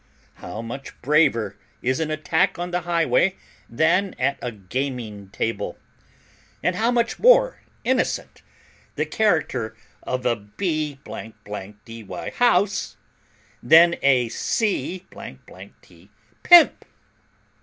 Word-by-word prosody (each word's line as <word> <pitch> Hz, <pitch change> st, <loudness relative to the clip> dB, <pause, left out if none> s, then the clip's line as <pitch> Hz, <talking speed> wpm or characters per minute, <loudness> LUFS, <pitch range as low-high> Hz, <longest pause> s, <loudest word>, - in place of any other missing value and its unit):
How 110 Hz, -, -6 dB
much 135 Hz, +4 st, -8 dB
braver 120 Hz, -8 st, +2 dB, 0.3 s
is 130 Hz, +1 st, 0 dB
an 160 Hz, -1 st, -1 dB
attack 160 Hz, +4 st, 0 dB
on 175 Hz, +1 st, -4 dB
the 180 Hz, 0 st, -1 dB
highway 175 Hz, +2 st, +2 dB, 0.3 s
than 170 Hz, +9 st, +1 dB
at 135 Hz, +2 st, 0 dB
a 125 Hz, -, -3 dB
gaming 110 Hz, -1 st, -5 dB
table; 115 Hz, +3 st, -3 dB, 0.9 s
and 180 Hz, -, +1 dB
how 225 Hz, +4 st, +1 dB
much 235 Hz, -1 st, 0 dB
more -, -, +5 dB, 0.2 s
innocent 260 Hz, +1 st, -1 dB, 0.5 s
the -, -, 0 dB
character 145 Hz, -, 0 dB, 0.2 s
of 125 Hz, 0 st, -4 dB
a 120 Hz, -1 st, +2 dB
b 150 Hz, -, -3 dB
dy 105 Hz, 0 st, -8 dB
house 205 Hz, -4 st, +2 dB, 0.6 s
than 170 Hz, +2 st, +6 dB
a 130 Hz, -4 st, +3 dB
c 190 Hz, -, -2 dB
t -, -, -14 dB, 0.3 s
pimp!" 345 Hz, -2 st, +7 dB
150 Hz, 105 wpm, -23 LUFS, 115-185 Hz, 0.9 s, pimp